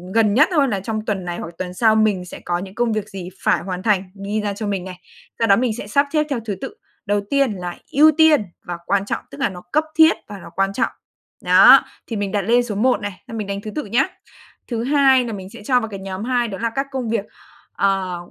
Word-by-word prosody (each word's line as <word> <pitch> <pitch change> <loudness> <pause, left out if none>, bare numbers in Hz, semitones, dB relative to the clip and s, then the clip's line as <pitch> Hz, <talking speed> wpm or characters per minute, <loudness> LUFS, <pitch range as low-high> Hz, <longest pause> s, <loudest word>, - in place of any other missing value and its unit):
gần 220 -3 +4
nhất 300 - +5
thôi 295 -5 +3
là 205 -6 -1
trong 215 +2 -4
tuần 195 -4 -2
này, 175 -1 -4
hoặc 170 - -6
tuần 180 -1 -5
sau 220 +3 +3
mình 210 -4 +2
sẽ 180 - -9
có 175 0 0
những 190 +1 -8
công 240 -1 +1
việc 215 -1 -3
gì 190 -3 -7
phải - - +2
hoàn 185 0 -5
thành, 200 -3 +2 0.2
ghi 210 +2 -1
ra 205 -1 -2
cho 210 +1 -5
mình 195 -3 -2
này. 185 -1 -8 0.4
Sau 230 - +2
đó 195 - +6
mình 240 -1 0
sẽ 205 - -7
sắp 280 +7 +2
xếp 305 -1 +3
theo 275 -4 -1
thứ 205 -3 -2
tự, - - -6 0.3
đầu 205 0 +1
tiên 275 -3 +2
là 180 -2 -6
ưu 305 +3 +6
tiên 315 -8 +5 0.2
và 175 -1 -4
quan 200 +1 +1
trọng, - - -3
tức - - -10
là - - +2
nó 180 -1 -9
cấp 305 - +3
thiết 320 +1 +6
và 205 -2 -8
nó - - -11
quan 195 +1 +1
trọng, 250 - 0 0.6
đó, - - +8 0.2
thì 230 - -4
mình 200 -2 -2
đặt 205 - 0
lên 235 +5 +3
số 225 -4 -5
một 250 +4 +2
này, 205 -3 -6
là 230 - -7
mình 215 -3 -4
đánh 200 0 -4
thứ 215 - -7
tự 300 - -3
nhá. 240 +7 +2 0.6
Thứ 230 -2 -2
hai 265 -1 +4
là 230 - -4
mình 190 -2 -7
sẽ 230 0 -12
cho 250 0 +3
vào 225 -2 -5
cái 195 -2 -7
nhóm 190 +1 -6
hai 245 0 0
đó 195 -3 -6
là 230 - 0
các 275 0 -1
công 260 -4 -3
việc, 220 -3 -1 0.5
ờ, 195 -2 0
215 Hz, 265 wpm, -20 LUFS, 195-245 Hz, 0.6 s, đó